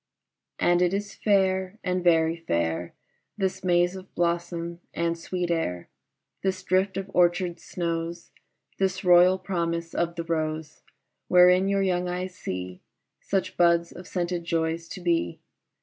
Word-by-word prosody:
AND 175 Hz, 0 st, +3 dB
it 180 Hz, +1 st, +2 dB
is 205 Hz, 0 st, -4 dB
fair 190 Hz, -1 st, +1 dB
and 180 Hz, 0 st, -1 dB
very 165 Hz, -1 st, +4 dB
fair 85 Hz, -, -2 dB, 0.4 s
This 190 Hz, -2 st, -2 dB
maze 175 Hz, 0 st, +2 dB
of 190 Hz, 0 st, -11 dB
blossom 170 Hz, 0 st, -1 dB, 0.2 s
and 170 Hz, 0 st, 0 dB
sweet 175 Hz, +1 st, -3 dB
air, 90 Hz, -, -2 dB, 0.5 s
This 190 Hz, -1 st, -1 dB
drift 190 Hz, +1 st, +1 dB
of 195 Hz, 0 st, -5 dB
orchard 175 Hz, 0 st, +2 dB
snows, 170 Hz, -1 st, -4 dB, 0.5 s
This 190 Hz, 0 st, 0 dB
royal 180 Hz, +1 st, +6 dB
promise 170 Hz, -3 st, -2 dB
of 170 Hz, 0 st, -1 dB
the 170 Hz, -, -3 dB
rose 155 Hz, -2 st, -3 dB, 0.5 s
Wherein 180 Hz, +1 st, +6 dB
your 200 Hz, 0 st, +2 dB
young 180 Hz, -1 st, 0 dB
eyes 180 Hz, +1 st, -3 dB
see 90 Hz, -, -6 dB, 0.4 s
Such 195 Hz, -2 st, -2 dB
buds 170 Hz, -1 st, +3 dB
of 180 Hz, -, -11 dB
scented 175 Hz, -1 st, -2 dB
joys 165 Hz, 0 st, -1 dB
to 185 Hz, -, -7 dB
be. 170 Hz, -, 0 dB
175 Hz, 140 wpm, -26 LUFS, 170-185 Hz, 0.5 s, royal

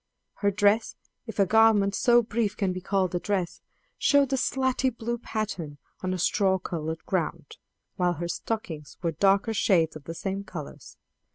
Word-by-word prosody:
Her 200 Hz, -, +2 dB
dress, 205 Hz, +2 st, +2 dB, 0.3 s
if 225 Hz, -, -7 dB
a 200 Hz, -, +4 dB
garment 215 Hz, -1 st, +4 dB
so 240 Hz, +1 st, +4 dB
brief 215 Hz, -2 st, -1 dB
can 190 Hz, -3 st, 0 dB
be 185 Hz, -, -5 dB
called 185 Hz, -1 st, 0 dB
a 175 Hz, -, 0 dB
dress, 185 Hz, -3 st, -2 dB, 0.4 s
showed 280 Hz, -2 st, +3 dB
a -, -, +4 dB
slaty 260 Hz, 0 st, +1 dB
blue 235 Hz, 0 st, -4 dB
pattern 195 Hz, -11 st, -4 dB, 0.2 s
on 185 Hz, -, -2 dB
a 185 Hz, -, -1 dB
straw 190 Hz, +2 st, +2 dB
colored 160 Hz, -3 st, -5 dB
ground, -, -, -3 dB, 0.4 s
while 180 Hz, -2 st, +2 dB
her 170 Hz, +1 st, -4 dB
stockings 170 Hz, -5 st, -5 dB
were 170 Hz, -, +1 dB
darker 195 Hz, +6 st, +2 dB
shades 170 Hz, -7 st, +2 dB
of 150 Hz, -2 st, -10 dB
the 165 Hz, -, -6 dB
same 195 Hz, +2 st, -3 dB
colors. 170 Hz, -7 st, -9 dB
195 Hz, 170 wpm, -27 LUFS, 175-225 Hz, 0.4 s, a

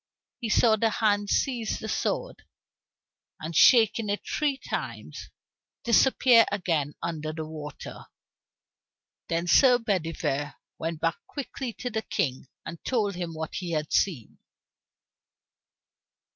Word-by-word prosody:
He 230 Hz, -, -4 dB
saw 220 Hz, 0 st, +4 dB
the 225 Hz, +1 st, +2 dB
hand 205 Hz, -2 st, +1 dB
seize 240 Hz, -5 st, 0 dB
the 220 Hz, -, -7 dB
sword, -, -, -2 dB, 1.0 s
and 160 Hz, +1 st, -6 dB
shaking 225 Hz, -, +5 dB
it 205 Hz, -, -2 dB
three 290 Hz, -3 st, -1 dB
times, -, -, -6 dB, 0.5 s
disappear 240 Hz, 0 st, +5 dB
again 165 Hz, -7 st, -1 dB
under 155 Hz, -2 st, -3 dB
the 155 Hz, 0 st, -5 dB
water. 155 Hz, -1 st, -9 dB, 1.2 s
Then 165 Hz, +1 st, -1 dB
Sir 250 Hz, +7 st, +6 dB
Bedivere 165 Hz, -, -2 dB, 0.2 s
went 165 Hz, -1 st, -4 dB
back 165 Hz, 0 st, 0 dB
quickly 270 Hz, -3 st, -5 dB
to 245 Hz, -, -5 dB
the 220 Hz, -, -1 dB
King, 130 Hz, -9 st, -2 dB, 0.2 s
and 170 Hz, -, -8 dB
told 215 Hz, -6 st, 0 dB
him 175 Hz, -2 st, -5 dB
what 160 Hz, 0 st, -5 dB
he 175 Hz, -3 st, -4 dB
had 155 Hz, -1 st, -2 dB
seen. 155 Hz, -, 0 dB
200 Hz, 120 wpm, -27 LUFS, 160-230 Hz, 1.2 s, Sir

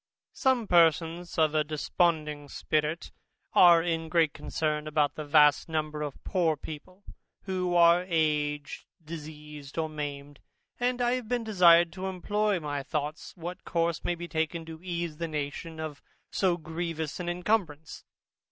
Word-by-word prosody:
Some 260 Hz, -4 st, +1 dB
persons 170 Hz, -1 st, +2 dB
of 155 Hz, -2 st, +3 dB
a 155 Hz, -1 st, +3 dB
desponding 150 Hz, -1 st, -1 dB
spirit 155 Hz, +3 st, -2 dB, 0.4 s
are 170 Hz, -2 st, +7 dB
in 165 Hz, -1 st, -2 dB
great 160 Hz, -2 st, +3 dB
concern 155 Hz, -1 st, -2 dB
about 150 Hz, -2 st, +1 dB
that 155 Hz, -, -6 dB
vast 150 Hz, +1 st, +4 dB
number 155 Hz, -1 st, -2 dB
of 145 Hz, -2 st, -6 dB
poor 165 Hz, -5 st, +1 dB
people, 170 Hz, +7 st, -10 dB, 0.4 s
who 185 Hz, -2 st, -1 dB
are 170 Hz, +1 st, +6 dB
aged, 150 Hz, -3 st, -1 dB, 0.2 s
diseased, 150 Hz, -2 st, -9 dB
or 160 Hz, -1 st, 0 dB
maimed; 145 Hz, -2 st, -6 dB, 0.4 s
and 245 Hz, 0 st, 0 dB
I 240 Hz, -, +2 dB
have 255 Hz, -3 st, -3 dB
been 245 Hz, -1 st, 0 dB
desired 175 Hz, -5 st, +5 dB
to 190 Hz, 0 st, -4 dB
employ 205 Hz, +2 st, 0 dB
my 145 Hz, -2 st, -3 dB
thoughts 150 Hz, +3 st, -4 dB
what 175 Hz, +2 st, -7 dB
course 170 Hz, -1 st, -1 dB
may 175 Hz, -, 0 dB
be 175 Hz, 0 st, -7 dB
taken, 160 Hz, 0 st, -2 dB
to 160 Hz, 0 st, -10 dB
ease 170 Hz, -3 st, -4 dB
the 170 Hz, 0 st, -3 dB
nation 155 Hz, +2 st, -5 dB
of 155 Hz, -2 st, -6 dB, 0.3 s
so 180 Hz, -3 st, +1 dB
grievous 160 Hz, -1 st, -4 dB
an 175 Hz, -1 st, -3 dB
incumbrance. 175 Hz, -5 st, -2 dB
160 Hz, 150 wpm, -28 LUFS, 150-175 Hz, 0.4 s, are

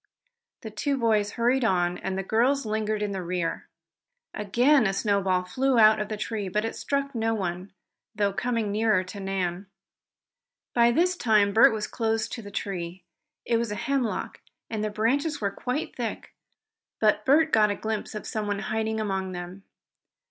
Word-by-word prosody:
The 220 Hz, -, -7 dB
two 275 Hz, +6 st, -1 dB
boys 215 Hz, -4 st, +1 dB
hurried 245 Hz, +2 st, +2 dB
on, 180 Hz, -4 st, +1 dB, 0.2 s
the 195 Hz, -, -2 dB
girls 245 Hz, +7 st, +1 dB
lingering 215 Hz, 0 st, -1 dB
in 205 Hz, -, -2 dB
the 190 Hz, -1 st, -3 dB
rear. 175 Hz, -1 st, -3 dB, 0.7 s
Again 240 Hz, +5 st, +3 dB
a 195 Hz, -, 0 dB
snowball 195 Hz, -3 st, +1 dB
flew 255 Hz, +8 st, 0 dB
out 215 Hz, -1 st, +6 dB
of 210 Hz, -, -3 dB
the 215 Hz, -, -3 dB
tree, 210 Hz, -1 st, -3 dB
but 210 Hz, +4 st, 0 dB
it 225 Hz, -, -4 dB
struck 280 Hz, 0 st, -2 dB
no 225 Hz, -1 st, 0 dB
one, 185 Hz, -1 st, -4 dB, 0.4 s
though 205 Hz, -1 st, +1 dB
coming 230 Hz, -1 st, -1 dB
near 215 Hz, -2 st, +2 dB
to 185 Hz, +2 st, -9 dB
Nan. 190 Hz, -1 st, -3 dB, 1.1 s
By 235 Hz, -1 st, +5 dB
this 355 Hz, +9 st, +2 dB
time 210 Hz, -, +3 dB
Bert 220 Hz, -, +7 dB
was 215 Hz, -1 st, -2 dB
close 225 Hz, -1 st, -1 dB
to 235 Hz, -, -6 dB
the 205 Hz, -, -9 dB
tree. 180 Hz, -3 st, -5 dB, 0.4 s
It 235 Hz, -, +2 dB
was 230 Hz, -2 st, -2 dB
a -, -, -2 dB
hemlock, 255 Hz, +1 st, -2 dB, 0.3 s
and 215 Hz, -1 st, -2 dB
the 215 Hz, -, 0 dB
branches 275 Hz, +9 st, 0 dB
were 200 Hz, -2 st, -1 dB
quite 250 Hz, +8 st, -4 dB
thick, -, -, -5 dB, 0.7 s
but 210 Hz, -1 st, +3 dB
Bert 315 Hz, +5 st, +4 dB
got 215 Hz, -1 st, +5 dB
a 205 Hz, -, -1 dB
glimpse 220 Hz, 0 st, -4 dB
of 215 Hz, -, -6 dB
someone 210 Hz, -2 st, -2 dB, 0.2 s
hiding 220 Hz, 0 st, -1 dB
among 190 Hz, -3 st, -2 dB
them. 180 Hz, +2 st, -8 dB
215 Hz, 170 wpm, -26 LUFS, 195-235 Hz, 1.1 s, Bert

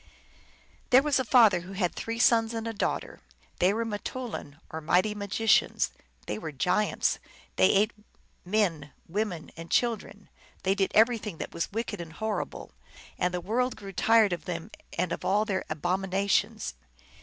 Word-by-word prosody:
There 260 Hz, +1 st, +7 dB
was 295 Hz, -3 st, +2 dB
a -, -, +1 dB
father 225 Hz, -7 st, +6 dB
who 180 Hz, +3 st, -9 dB
had 185 Hz, -3 st, 0 dB
three 230 Hz, 0 st, -4 dB
sons 230 Hz, -1 st, +4 dB
and 225 Hz, 0 st, -3 dB
a 225 Hz, -, -3 dB
daughter: 205 Hz, -, -2 dB, 0.4 s
they 180 Hz, +2 st, +4 dB
were 230 Hz, +2 st, -1 dB
nittoulin, 215 Hz, -, -5 dB
or 160 Hz, -, -5 dB
mighty 180 Hz, +6 st, +2 dB
magicians; 205 Hz, +1 st, +2 dB, 0.3 s
they 105 Hz, -, -3 dB
were 155 Hz, -, -5 dB
giants; 180 Hz, +9 st, +1 dB, 0.4 s
they -, -, +5 dB
ate 210 Hz, +3 st, +3 dB, 0.5 s
men, 175 Hz, -8 st, 0 dB
women, 185 Hz, -3 st, -3 dB
and 165 Hz, +1 st, -9 dB
children; 220 Hz, -4 st, -1 dB, 0.4 s
they 190 Hz, -, +3 dB
did 195 Hz, -1 st, +1 dB
everything 220 Hz, -5 st, +3 dB
that -, -, -6 dB
was 170 Hz, -, -2 dB
wicked 215 Hz, -3 st, -3 dB
and 165 Hz, -2 st, -9 dB
horrible; 215 Hz, +1 st, -4 dB, 0.5 s
and 180 Hz, -, +1 dB
the 180 Hz, -, -2 dB
world 245 Hz, +7 st, 0 dB
grew 195 Hz, -2 st, -9 dB
tired 220 Hz, 0 st, +4 dB
of 170 Hz, -3 st, -5 dB
them 175 Hz, +3 st, -5 dB, 0.3 s
and 180 Hz, 0 st, 0 dB
of -, -, -3 dB
all 205 Hz, +3 st, +2 dB
their 195 Hz, -3 st, -2 dB
abomina 185 Hz, +5 st, -1 dB
tions. 65 Hz, -, +1 dB
200 Hz, 165 wpm, -28 LUFS, 175-225 Hz, 0.5 s, There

